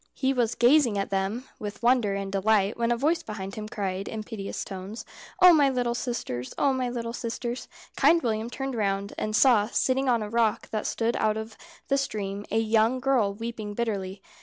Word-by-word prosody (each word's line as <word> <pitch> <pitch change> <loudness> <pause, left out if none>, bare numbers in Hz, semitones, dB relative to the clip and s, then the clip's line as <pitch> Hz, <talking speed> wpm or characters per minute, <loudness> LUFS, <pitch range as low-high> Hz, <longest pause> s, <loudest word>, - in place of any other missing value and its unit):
He 265 0 +1
was 240 -3 0
gazing 240 -3 +4
at 195 - -2
them 195 +5 -1 0.2
with 210 0 -7
wonder 240 -5 +3
and 195 0 -4
delight, 200 +1 +2
when 235 0 0
a 240 - +2
voice 315 +7 +1
behind 195 -2 -6
him 215 0 -6
cried, 195 -2 -3
in 220 -1 -5
piteous 210 -3 -5
tones 195 +3 -7 0.3
"Oh, 360 -1 +9
my 290 -4 +5
little 245 -2 0
sisters! 230 - -4
Oh, 280 -1 +3
my 255 -1 -1
little 235 -1 -4
sisters!" 240 +1 -4 0.3
Kind 335 -2 +4
William 225 -1 -1
turned 270 +2 -4
round, 200 -3 -1
and 215 0 -1
saw, 230 -5 +5
sitting 260 +3 +1
on 235 -3 +2
a - - -4
rock 230 -2 +1
that 215 -1 -2
stood 230 +1 0
out 215 0 +1
of 220 0 -6 0.3
the 275 0 +2
stream, 205 -5 -4
a - - 0
young 225 +3 +2
girl 250 -7 +1
weeping 220 -2 -5
bitterly. 200 -4 -3
225 Hz, 195 wpm, -27 LUFS, 205-245 Hz, 0.3 s, Oh